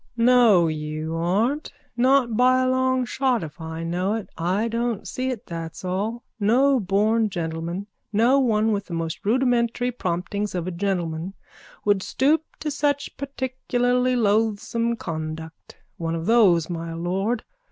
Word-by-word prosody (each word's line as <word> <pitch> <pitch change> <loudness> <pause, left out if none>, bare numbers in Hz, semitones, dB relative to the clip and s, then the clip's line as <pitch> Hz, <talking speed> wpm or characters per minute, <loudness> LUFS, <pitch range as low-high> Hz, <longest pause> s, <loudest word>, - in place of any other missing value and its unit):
_ - - -51
No, 230 -7 +5
you 155 +1 -3
aren't. 210 - 0 0.2
Not 250 -1 +3
by 255 +2 +4
a - - +1
long 260 0 +2
shot 255 -3 0
if 155 +1 -9
I 160 0 -5
know 180 +5 -1
it. 215 -5 -6
I 185 +7 0
don't 230 -2 -2
see 255 +1 -2
it, 245 -5 -5
that's 165 +1 -6
all. 210 +6 -2 0.2
No 255 +6 +4
born 210 +3 +2
gentleman, 170 +2 -4 0.3
no 235 +6 +4
one 220 -4 +2
with 200 -1 -1
the 170 - -4
most 165 -1 -4
rudimentary 245 +1 +1
promptings 200 -1 -3
of 175 -2 -2
a 185 - -3
gentleman 175 -1 -2 0.5
would 205 -2 +3
stoop 295 +10 +2 0.2
to 300 - -2
such 285 0 -1
particularly 255 -2 0
loathsome 225 +1 +1
conduct. 160 -4 -7 0.2
One 165 -1 -2
of 165 0 -4
those, 195 -8 +4
my 165 -1 -5
lord. 195 +7 -1
210 Hz, 150 wpm, -24 LUFS, 170-245 Hz, 0.5 s, No